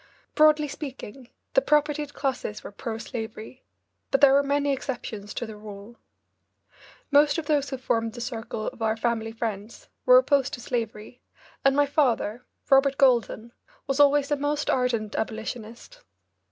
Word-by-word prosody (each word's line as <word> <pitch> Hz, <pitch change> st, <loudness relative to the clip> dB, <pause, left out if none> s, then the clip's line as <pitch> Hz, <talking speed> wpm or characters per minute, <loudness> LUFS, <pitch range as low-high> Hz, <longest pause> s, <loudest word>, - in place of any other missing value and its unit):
Broadly 305 Hz, 0 st, +4 dB
speaking, 270 Hz, -4 st, -8 dB, 0.2 s
the -, -, +5 dB
propertied 295 Hz, -4 st, 0 dB
classes 260 Hz, -6 st, -3 dB
were -, -, -8 dB
pro 220 Hz, +2 st, -5 dB
slavery, 225 Hz, +1 st, -7 dB, 0.5 s
but 275 Hz, -, +2 dB
there 275 Hz, -1 st, +7 dB
were 280 Hz, -, +5 dB
many 285 Hz, 0 st, 0 dB
exceptions 230 Hz, -6 st, -5 dB
to 240 Hz, -, -3 dB
the 220 Hz, -1 st, -9 dB
rule. 210 Hz, +2 st, -11 dB, 1.2 s
Most 290 Hz, +1 st, +5 dB
of 325 Hz, -, -3 dB
those 290 Hz, -2 st, +1 dB
who 265 Hz, -, -4 dB
formed 230 Hz, -3 st, -1 dB
the 240 Hz, -, -9 dB
circle 225 Hz, -2 st, -5 dB
of -, -, -17 dB
our 220 Hz, 0 st, 0 dB
family 225 Hz, -1 st, -1 dB
friends 225 Hz, -1 st, -6 dB, 0.2 s
were -, -, +9 dB
opposed 285 Hz, -, +2 dB
to -, -, -13 dB
slavery, 230 Hz, -1 st, -5 dB, 0.4 s
and 275 Hz, 0 st, +4 dB
my 290 Hz, 0 st, +4 dB
father, 250 Hz, -5 st, 0 dB, 0.2 s
Robert 270 Hz, 0 st, +4 dB
Goulden, 240 Hz, -3 st, +2 dB, 0.3 s
was 275 Hz, +1 st, -2 dB
always 290 Hz, 0 st, +4 dB
a -, -, +4 dB
most 290 Hz, +1 st, -1 dB
ardent 235 Hz, -5 st, 0 dB
abolitionist. 225 Hz, -, -6 dB
255 Hz, 155 wpm, -26 LUFS, 225-285 Hz, 1.2 s, were